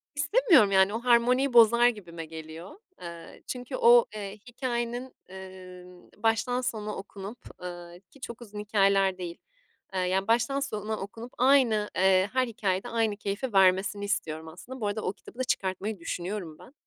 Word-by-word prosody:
İstemiyorum 290 - +4
yani, 190 +2 +4
o 225 - -1
harmoniyi 250 +2 +3
bozar 235 +1 +7
gibime 175 -8 -4
geliyor. 160 +2 -9 0.3
Eee, 170 -1 -10
çünkü 250 +1 -5
o, 240 -1 +6
eee, 205 0 -6
hikâyenin, 245 0 -4
eee, 185 -1 -11 0.3
baştan 225 +3 +1
sona 215 -4 -3
okunup, 200 +3 -8 0.3
ııı, 175 0 -8
ki 275 - -19
çok 235 +1 -8
uzun 210 -2 -9
hikâyeler 195 -2 +2
değil, 175 -2 -6 0.6
ya 185 +2 0
baştan 240 +4 +2
sona 220 -5 -3
okunup 225 +5 -8
aynı, 245 -5 +4
eee, 190 +1 +3
her 255 -1 +2
hikâyede 195 -4 -2
aynı 225 -3 0
keyfi 210 +4 -4
vermesini 195 +1 +3
istiyorum 160 -6 -3
aslında. 230 +10 -10
Bu 205 - 0
arada 210 +1 -2
o - - -1
kitabı 240 - -16
da 255 - +1
çıkartmayı 195 -2 -2
düşünüyorum 175 -1 -5
ben. 260 - -15
210 Hz, 155 wpm, -28 LUFS, 190-240 Hz, 0.6 s, bozar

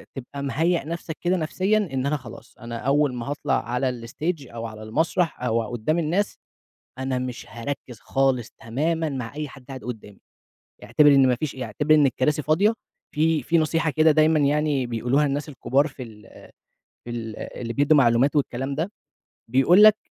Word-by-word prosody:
تبقى 140 +1 -7
مِهيّأ 165 +5 +1
نفْسك 165 0 -5
كده 180 +1 +1
نفسيًا 185 +6 +1
إن 135 -11 -1
أنا 150 +2 +1
خلاص، 120 -5 -13
أنا 115 -1 -7
أول 140 +2 +1
ما 120 -1 -5
هاطلع 140 -4 -1
على 125 -1 -2
الstage 150 +2 -3
أو 115 0 -5
على 110 -1 -8
المسرح 160 +7 0
أو 115 -2 +1
قُدّام 120 +8 0
الناس، 175 +6 0 0.6
أنا 130 -1 -2
مش 125 -1 -5
هاركِّز 120 0 -6
خالص 135 -4 0
تمامًا 160 +7 -2
مع 130 -4 -5
أي 150 0 -3
حد 135 -1 -14
قاعد 135 -2 -8
قُدّامي، 110 -5 -8 0.7
اعتبِر 150 -1 +4
إن 135 -1 +5
ما 125 - +2
فيش 150 +2 -4
ي 130 - -5
اعتبِر 145 +8 +2
إن 150 -2 +5
الكراسي 150 +4 0
فاضية. 165 +9 +3 0.4
في 155 0 +2
في 170 +7 +2
نصيحة 160 +1 +1
كده 155 +1 +4
دايمًا 155 +1 +4
يعني 145 -2 +1
بيقولوها 120 +5 +1
الناس 140 +1 -2
الكبار 140 0 +1
في 135 -2 -10
ال 110 -2 -12 0.8
في - - -8
ال 115 -2 -5
اللي 115 -1 -6
بيدّوا 145 +4 +4
معلومات 125 +2 +3
والكلام 135 -1 -1
ده، 165 +7 -2 0.6
بيقول 150 - +5
لك 215 0 +8
140 Hz, 175 wpm, -24 LUFS, 125-155 Hz, 0.8 s, لك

